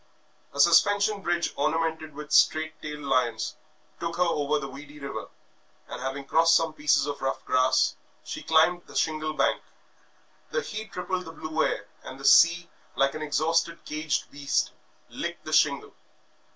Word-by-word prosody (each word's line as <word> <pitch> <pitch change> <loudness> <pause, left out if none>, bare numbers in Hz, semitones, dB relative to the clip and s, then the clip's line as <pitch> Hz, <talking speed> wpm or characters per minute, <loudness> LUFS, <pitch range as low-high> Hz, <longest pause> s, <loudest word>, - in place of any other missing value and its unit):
A 140 - -9
suspension 200 +6 +4
bridge, 175 -2 -1
ornamented 160 0 -1
with 150 0 -9
straight 160 +1 +3
tailed 150 -1 -6
lions, 130 -4 0 0.4
took 170 0 -4
her 180 - +4
over 150 -4 0
the 140 -2 -4
weedy 145 +2 -11
river, 140 -6 -6 0.6
and 125 - -7
having 135 +1 -4
crossed 165 +3 +4
some 160 -1 +1
pieces 150 -2 +2
of 145 -1 -5
rough 135 0 -3
grass, 130 0 +2 0.3
she - - -6
climbed 160 +2 +3
the - - -14
shingle 155 -1 0
bank. - - +1 0.9
The 485 - -1
heat 215 0 -7
rippled 180 0 -3
the 160 - -8
blue 155 0 -2
air, 105 - -1 0.2
and 130 +1 -10
the 135 - -8
sea, 170 +3 +6 0.3
like 135 0 +2
an 155 - -6
exhausted 165 +2 0
caged 155 0 -2
beast, 140 0 -1 0.4
licked - - -6
the - - -5
shingle. - - +2
155 Hz, 160 wpm, -26 LUFS, 140-170 Hz, 0.9 s, sea